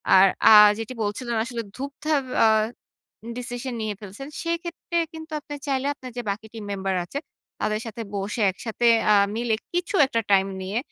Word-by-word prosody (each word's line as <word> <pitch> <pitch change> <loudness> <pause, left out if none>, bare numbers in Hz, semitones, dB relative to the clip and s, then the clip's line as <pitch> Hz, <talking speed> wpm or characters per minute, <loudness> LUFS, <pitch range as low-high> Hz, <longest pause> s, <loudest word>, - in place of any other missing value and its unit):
আর 190 +1 +8 0.2
আ - - +8 0.3
যেটি 225 +3 -5
বলছিলেন 235 +4 -2
আসলে 240 -1 -4
ধুপধাপ 280 +2 -1
অ্যা - - +6 0.9
ডিসিশন 245 +1 -4
নিয়ে 215 -1 -2
ফেলছেন, 205 +6 -9 0.2
সেক্ষেত্রে 340 0 -3 0.2
কিন্তু 320 0 -10
আপনি 290 - -8
চাইলে 270 -1 0
আপনার 255 -3 -10
যে 245 - -2
বাকি 210 +2 -4
টিম 225 -2 -7
মেম্বার 195 -1 -2
আছে, 275 +11 -5 0.4
তাদের 215 0 0
সাথে 225 +1 -6
বসে 200 +3 -3
একসাথে 225 +5 -2 0.3
আ - - +6 0.2
মিলে 235 -1 +1 0.2
কিছু 355 +3 -2
একটা 230 -3 0
time 195 0 +4
নিয়ে, 195 +4 -2
235 Hz, 165 wpm, -24 LUFS, 210-275 Hz, 0.9 s, আর